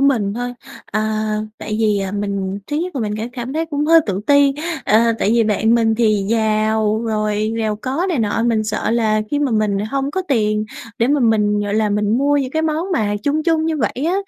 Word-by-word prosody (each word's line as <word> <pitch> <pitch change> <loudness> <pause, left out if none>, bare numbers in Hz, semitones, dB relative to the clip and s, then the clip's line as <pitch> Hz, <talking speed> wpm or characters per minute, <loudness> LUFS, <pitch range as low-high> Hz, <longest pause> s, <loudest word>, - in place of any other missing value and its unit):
mình 235 -8 +2
thôi. 245 +1 -3 0.3
À, 215 +1 -1 0.3
tại 215 - -4
vì, 210 -2 +2
à, 195 0 -3
mình, 200 -1 -3
thứ 295 - -3
nhất 355 +2 -3
là - - -1
mình 210 -1 -2
ca 220 +1 -3
cảm 250 0 -5
thấy 320 +2 -1
cũng 295 -2 -2
hơi 330 0 +7
tự 195 -1 -2
ti, 285 -1 +5 0.3
à, 230 +2 +4
tại 205 - +1
vì 230 -1 +3
bạn 220 +2 +2
mình 225 -1 +2
thì 215 -3 +2
giàu, 220 0 +1
rồi 215 -1 -1
giàu 215 -1 -1
có 270 - -2
này 335 -8 0
nọ, 220 0 0
mình 230 -2 +1
sợ 215 0 -2
là 220 -2 +2
khi 290 - 0
mà 290 -2 0
mình 215 -3 +1
hông 275 0 -1
có 375 +5 -2
tiền 215 -5 +1 0.3
để 235 - +2
mà 290 0 +2
mình, 210 -3 +2
gọi 205 0 -2
là, 215 -1 +1
mình 210 +3 +1
mua 290 +1 +2
những 265 -2 -1
cái 315 +3 -1
món 320 +4 -1
mà 205 -10 0
chung 295 +4 0
chung 320 -1 +1
như 320 -1 0
vậy 255 +1 -2
á, 355 - +1
225 Hz, 230 wpm, -19 LUFS, 215-275 Hz, 0.3 s, hơi